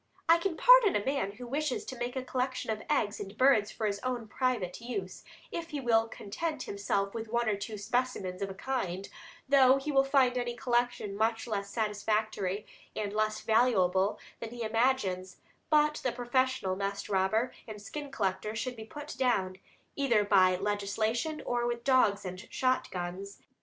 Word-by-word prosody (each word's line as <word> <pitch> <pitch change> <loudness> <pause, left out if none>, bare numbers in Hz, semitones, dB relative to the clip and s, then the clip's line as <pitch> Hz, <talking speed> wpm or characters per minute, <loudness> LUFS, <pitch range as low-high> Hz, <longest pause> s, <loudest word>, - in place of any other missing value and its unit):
I 335 +1 +6
can 340 -2 -2
pardon - - +7
a 205 - 0
man 270 -8 -1
who 245 +4 -9
wishes 280 +2 -2
to 260 - -6
make 245 +1 -4
a 260 - -2
collection 255 -2 -2
of 215 -1 -3
eggs 220 -8 +1
and 200 +1 -7
birds 255 -6 +4
for 220 - -3
his 200 -1 -1
own 245 -3 -3
private 230 -6 -1
use, 205 -6 -5 0.3
if 335 -1 -4
he 295 - -3
will 230 -3 +3
content 275 +9 -4
himself 200 0 -1
with 225 -1 -5
one 235 +1 0
or 215 - +2
two 200 +2 -6
specimens 200 -4 -2
of 195 - -2
a 190 - -7
kind, 195 -6 -3 0.4
though 265 -1 +6
he 285 +2 -3
will 270 -1 +5
find 265 -2 +3
any 240 -1 -3
collection 240 -4 0
much 225 +2 0
less 200 -4 -3
satisfactory 210 -2 -1 0.3
and 205 -1 -3
less 215 0 0
valuable 205 -4 +3 0.2
than 230 - -5
he 240 0 -6
imagines, 220 -6 0 0.3
but 300 0 +3
the 255 - +1
professional 245 -4 0
nest 200 +1 -3
robber 205 +5 +1
and 215 -2 -7
skin 290 +8 -7
collector 210 -3 -2
should 250 +3 -3
be 220 -1 -8
put 295 +6 -8
down, 190 -8 +1 0.4
either 240 -7 +3
by 185 -3 +5
legislation 210 - -1
or 240 0 0
with 240 0 -3
dogs 220 -7 +3
and 185 +1 -7
shotguns. 195 -6 -2
225 Hz, 175 wpm, -30 LUFS, 200-255 Hz, 0.4 s, pardon